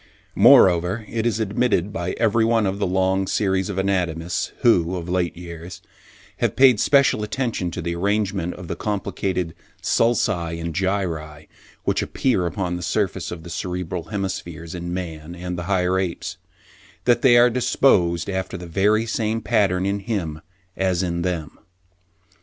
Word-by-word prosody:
Moreover, 90 Hz, +4 st, +5 dB
it 115 Hz, 0 st, -1 dB
is 115 Hz, -2 st, 0 dB
admitted 105 Hz, -2 st, 0 dB
by 90 Hz, -5 st, -3 dB
every 115 Hz, 0 st, +2 dB
one 115 Hz, -1 st, +2 dB
of 95 Hz, +1 st, -2 dB
the 100 Hz, -, +1 dB
long 95 Hz, +1 st, +1 dB
series 95 Hz, -2 st, 0 dB
of 100 Hz, -, -4 dB
anatomists 90 Hz, -3 st, -1 dB
who, 90 Hz, -7 st, +3 dB
of 85 Hz, -1 st, -5 dB
late 90 Hz, -2 st, -1 dB
years, 85 Hz, +1 st, -9 dB, 0.6 s
have -, -, 0 dB
paid 130 Hz, -5 st, +6 dB
special 140 Hz, -5 st, +4 dB
attention 105 Hz, -4 st, -2 dB
to 85 Hz, 0 st, -5 dB
the 85 Hz, 0 st, -2 dB
arrangement 95 Hz, -1 st, -1 dB
of 90 Hz, -1 st, -9 dB
the 85 Hz, -, -3 dB
complicated 95 Hz, -3 st, -2 dB, 0.3 s
sulci 90 Hz, -8 st, +1 dB
and 85 Hz, 0 st, -4 dB
gyri 80 Hz, -5 st, -2 dB, 0.4 s
which -, -, +1 dB
appear 110 Hz, -10 st, 0 dB
upon 90 Hz, 0 st, -2 dB
the -, -, -7 dB
surface 90 Hz, 0 st, -1 dB
of 85 Hz, -2 st, -7 dB
the 85 Hz, -, -9 dB
cerebral 90 Hz, -1 st, -4 dB
hemispheres 85 Hz, -5 st, -5 dB
in 85 Hz, -1 st, -5 dB
man 85 Hz, -2 st, -5 dB
and 90 Hz, 0 st, -5 dB
the 85 Hz, -, -4 dB
higher 95 Hz, -1 st, +2 dB
apes, 90 Hz, -3 st, -4 dB, 0.7 s
that 120 Hz, -1 st, +3 dB
they 125 Hz, -4 st, +6 dB
are 120 Hz, +1 st, +6 dB
disposed 105 Hz, -9 st, +2 dB
after 95 Hz, -1 st, -3 dB
the 90 Hz, -, -8 dB
very 105 Hz, +6 st, +2 dB
same 110 Hz, 0 st, -1 dB
pattern 100 Hz, -6 st, +1 dB
in 100 Hz, +1 st, 0 dB
him, 95 Hz, -8 st, -3 dB, 0.3 s
as 95 Hz, -1 st, 0 dB
in 85 Hz, -1 st, -2 dB
them. 85 Hz, -3 st, -3 dB
95 Hz, 160 wpm, -22 LUFS, 85-105 Hz, 0.7 s, paid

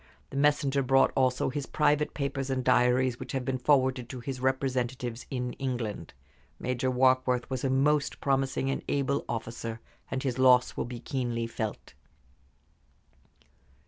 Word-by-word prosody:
The -, -, -8 dB
messenger 140 Hz, -1 st, +2 dB
brought 135 Hz, 0 st, +3 dB
also 130 Hz, -1 st, +2 dB
his 140 Hz, +1 st, -4 dB
private 150 Hz, 0 st, +1 dB
papers 140 Hz, -1 st, -2 dB
and 130 Hz, -1 st, -1 dB
diaries, 125 Hz, 0 st, +3 dB
which 130 Hz, +1 st, -7 dB
have 130 Hz, -2 st, -2 dB
been 130 Hz, 0 st, -1 dB
forwarded 130 Hz, -2 st, +2 dB
to 130 Hz, -, -6 dB
his 130 Hz, +1 st, -5 dB
representatives 130 Hz, -2 st, -1 dB
in 125 Hz, -2 st, -3 dB
England. 125 Hz, -6 st, -4 dB, 0.4 s
Major 125 Hz, +1 st, -1 dB
Warkworth 130 Hz, -1 st, +2 dB
was 130 Hz, -2 st, -2 dB
a 135 Hz, -, +1 dB
most 140 Hz, +2 st, +2 dB
promising 135 Hz, -1 st, 0 dB
and -, -, -2 dB
able 140 Hz, 0 st, 0 dB
officer, 115 Hz, 0 st, -4 dB, 0.3 s
and 130 Hz, -, -3 dB
his 130 Hz, -2 st, -2 dB
loss 125 Hz, -1 st, +5 dB
will -, -, -2 dB
be 120 Hz, 0 st, -7 dB
keenly 120 Hz, -3 st, -2 dB
felt." 110 Hz, -2 st, -5 dB
130 Hz, 145 wpm, -29 LUFS, 125-135 Hz, 0.4 s, loss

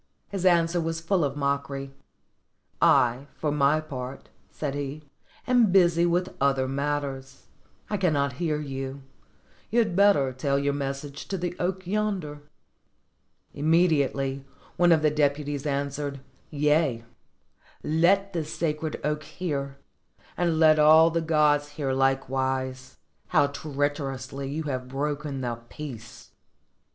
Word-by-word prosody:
His 190 Hz, -2 st, 0 dB
answer 170 Hz, -1 st, +3 dB
was 165 Hz, 0 st, -2 dB
full 170 Hz, +1 st, +1 dB
of 140 Hz, -1 st, -1 dB
mockery: 140 Hz, -1 st, -2 dB, 0.9 s
"I, 125 Hz, +3 st, +4 dB
for 150 Hz, -, -2 dB
my 145 Hz, +1 st, +3 dB
part," 135 Hz, -4 st, -7 dB, 0.2 s
said 145 Hz, -3 st, -4 dB
he, 145 Hz, +1 st, -5 dB, 0.4 s
"am 245 Hz, -5 st, +4 dB
busy 175 Hz, -2 st, +4 dB
with 180 Hz, +2 st, 0 dB
other 135 Hz, -1 st, +2 dB
matters: 135 Hz, -1 st, -3 dB, 0.4 s
I 210 Hz, -, -1 dB
cannot 145 Hz, -8 st, +1 dB
hear 155 Hz, -3 st, 0 dB
you; 135 Hz, -1 st, -5 dB, 0.7 s
you 230 Hz, -, -1 dB
had 220 Hz, -7 st, +2 dB
better 185 Hz, -10 st, +4 dB
tell 140 Hz, +2 st, 0 dB
your 140 Hz, 0 st, 0 dB
message 140 Hz, +1 st, -5 dB
to 195 Hz, -, -3 dB
the 175 Hz, 0 st, -3 dB
oak 185 Hz, +1 st, -2 dB
yonder." 185 Hz, -7 st, -2 dB, 1.1 s
Immediately 140 Hz, -4 st, +1 dB, 0.3 s
one 175 Hz, 0 st, +4 dB
of 160 Hz, -2 st, +4 dB
the 150 Hz, -, +4 dB
deputies 145 Hz, -1 st, 0 dB
answered, 140 Hz, 0 st, -2 dB, 0.3 s
'*Yea, 150 Hz, -5 st, +1 dB, 0.8 s
let 190 Hz, +6 st, +2 dB
this 160 Hz, -3 st, -3 dB
sacred 160 Hz, -1 st, -2 dB
oak 150 Hz, +1 st, -1 dB
hear, 140 Hz, -7 st, -4 dB, 0.6 s
and 170 Hz, -2 st, +1 dB
let 155 Hz, -1 st, +5 dB
all 160 Hz, +2 st, +7 dB
the 165 Hz, 0 st, 0 dB
gods 150 Hz, -2 st, +2 dB
hear 140 Hz, -3 st, -1 dB
Hkewise, 130 Hz, -1 st, -1 dB, 0.3 s
how -, -, +4 dB
treacherously 140 Hz, -2 st, -3 dB
you 155 Hz, +3 st, -3 dB
have 130 Hz, -4 st, -4 dB
broken 145 Hz, +1 st, -3 dB
the 120 Hz, -2 st, -3 dB
peace 125 Hz, -7 st, -9 dB
145 Hz, 125 wpm, -26 LUFS, 135-165 Hz, 1.1 s, all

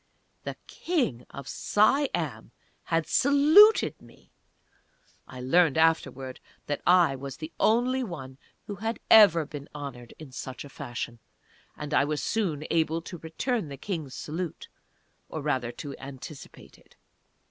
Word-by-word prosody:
THE -, -, -4 dB
KING 245 Hz, -, -2 dB
OF 140 Hz, -1 st, -9 dB
SIAM 270 Hz, +7 st, +1 dB, 0.4 s
HAD 165 Hz, -1 st, 0 dB
SALUTED 300 Hz, -, +5 dB
ME! -, -, -19 dB, 1.0 s
(I 130 Hz, -, -10 dB
learned 155 Hz, +4 st, +3 dB
afterwards 135 Hz, -5 st, +1 dB, 0.3 s
that 145 Hz, -, -3 dB
I 175 Hz, -6 st, +5 dB
was 135 Hz, 0 st, -7 dB
the 155 Hz, +1 st, -7 dB
only 250 Hz, +4 st, +2 dB
one 135 Hz, -, -8 dB, 0.3 s
who 205 Hz, -, -6 dB
had 225 Hz, +3 st, -3 dB
ever 180 Hz, -8 st, +8 dB
been 145 Hz, -1 st, -9 dB
honoured 130 Hz, -5 st, -8 dB
in 155 Hz, -4 st, -11 dB
such 130 Hz, 0 st, -7 dB
fashion. 120 Hz, -4 st, -6 dB, 0.6 s
And 150 Hz, 0 st, -6 dB
I -, -, +4 dB
was 150 Hz, 0 st, -2 dB
soon 170 Hz, -10 st, -1 dB
able 165 Hz, 0 st, +1 dB
to 175 Hz, 0 st, -8 dB
return 190 Hz, -, -2 dB
the 140 Hz, -, -7 dB
King's 155 Hz, -5 st, -5 dB
salute, 165 Hz, +2 st, -5 dB, 0.6 s
or 155 Hz, -, -5 dB
rather 130 Hz, -5 st, -1 dB
to 140 Hz, +2 st, -7 dB
anticipate 135 Hz, +2 st, -11 dB
it.) -, -, -25 dB
155 Hz, 135 wpm, -27 LUFS, 135-200 Hz, 1.0 s, ever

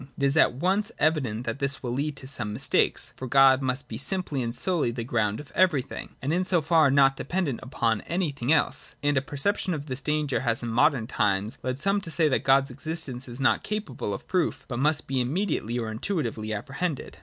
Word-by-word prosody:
It -, -, -4 dB
is 140 Hz, +1 st, +3 dB
at 160 Hz, -, +4 dB
once 190 Hz, +8 st, 0 dB
evident 135 Hz, -7 st, 0 dB
that 115 Hz, +2 st, -3 dB
this 140 Hz, -1 st, -1 dB
will 120 Hz, -, -2 dB
lead 140 Hz, +4 st, -2 dB
to 135 Hz, -, -8 dB
some 120 Hz, -6 st, -2 dB
mistake: 105 Hz, -, +2 dB, 0.2 s
for 130 Hz, -, -6 dB
God 135 Hz, +1 st, +6 dB
must 130 Hz, +1 st, -2 dB
be -, -, -6 dB
simply 150 Hz, -2 st, -2 dB
and 115 Hz, 0 st, -3 dB
solely 170 Hz, -4 st, 0 dB
the 120 Hz, 0 st, -4 dB
ground 110 Hz, -3 st, 0 dB
of 150 Hz, -, -11 dB
everything, 170 Hz, -8 st, 0 dB
and 145 Hz, +4 st, 0 dB
in 180 Hz, +2 st, +2 dB
so 180 Hz, -1 st, +2 dB
far 160 Hz, -1 st, +4 dB
not 135 Hz, 0 st, +5 dB
dependent 150 Hz, -3 st, -2 dB
upon 115 Hz, -4 st, 0 dB
anything 150 Hz, -7 st, -1 dB
else. 160 Hz, -, +1 dB
And 145 Hz, 0 st, +2 dB
a 135 Hz, -, +3 dB
perception 165 Hz, +6 st, -1 dB
of 145 Hz, -1 st, -6 dB
this 130 Hz, -2 st, -4 dB
danger 150 Hz, -1 st, 0 dB
has 120 Hz, -2 st, 0 dB
in 120 Hz, -, -3 dB
modern 120 Hz, +1 st, +3 dB
times 105 Hz, -1 st, 0 dB
led 130 Hz, 0 st, -2 dB
some 195 Hz, +7 st, +1 dB
to 180 Hz, -, -7 dB
say 160 Hz, -1 st, +2 dB
that 130 Hz, -, +1 dB
God's 135 Hz, 0 st, +4 dB
existence 135 Hz, -3 st, -4 dB
is 120 Hz, +1 st, -9 dB
not 135 Hz, -, +3 dB
capable 205 Hz, -, -4 dB
of 100 Hz, -, -6 dB
proof, 180 Hz, -3 st, 0 dB
but 120 Hz, -2 st, -4 dB
must 150 Hz, +2 st, +1 dB
be 130 Hz, -1 st, 0 dB
immediately 135 Hz, -, -1 dB
or 115 Hz, -2 st, -3 dB
intuitively 115 Hz, -, -3 dB
ap 105 Hz, +1 st, -4 dB
prehended. 145 Hz, +1 st, -3 dB
135 Hz, 215 wpm, -26 LUFS, 120-160 Hz, 0.2 s, God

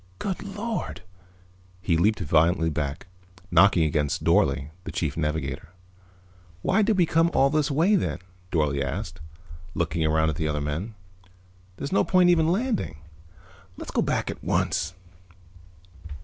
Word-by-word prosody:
"Good 190 Hz, -, -3 dB
Lord!" 205 Hz, -, -5 dB, 0.8 s
He 90 Hz, -2 st, 0 dB
leaped 100 Hz, +6 st, +2 dB
violently 80 Hz, +1 st, +2 dB
back, 70 Hz, -1 st, -3 dB, 0.5 s
knocking 100 Hz, -4 st, +5 dB
against 75 Hz, -2 st, 0 dB
Dorle, 70 Hz, +2 st, +2 dB
the -, -, -6 dB
Chief 75 Hz, -4 st, -2 dB
Navigator. 75 Hz, -3 st, -3 dB, 0.9 s
"Why 220 Hz, -, +3 dB
did 215 Hz, -1 st, +2 dB
we 180 Hz, -, +5 dB
come 165 Hz, +1 st, +3 dB
all 135 Hz, 0 st, +4 dB
this 150 Hz, -2 st, +1 dB
way, 165 Hz, +9 st, +3 dB
then?" 185 Hz, -, 0 dB, 0.3 s
Dorle 75 Hz, -4 st, +1 dB
asked, 80 Hz, +5 st, -4 dB, 0.6 s
looking 80 Hz, -1 st, -1 dB
around 80 Hz, 0 st, +2 dB
at 75 Hz, -, -7 dB
the 80 Hz, -2 st, -1 dB
other 75 Hz, -1 st, -1 dB
men. 80 Hz, +10 st, -4 dB, 0.8 s
"There's 140 Hz, -, -5 dB
no 195 Hz, -, +3 dB
point 180 Hz, -1 st, +4 dB
even 160 Hz, -2 st, +3 dB
in -, -, +2 dB
landing. 215 Hz, -, -1 dB, 0.8 s
Let's -, -, -7 dB
go -, -, +1 dB
back -, -, -1 dB
at -, -, -11 dB
once." 85 Hz, +3 st, 0 dB
85 Hz, 145 wpm, -25 LUFS, -, 0.9 s, knocking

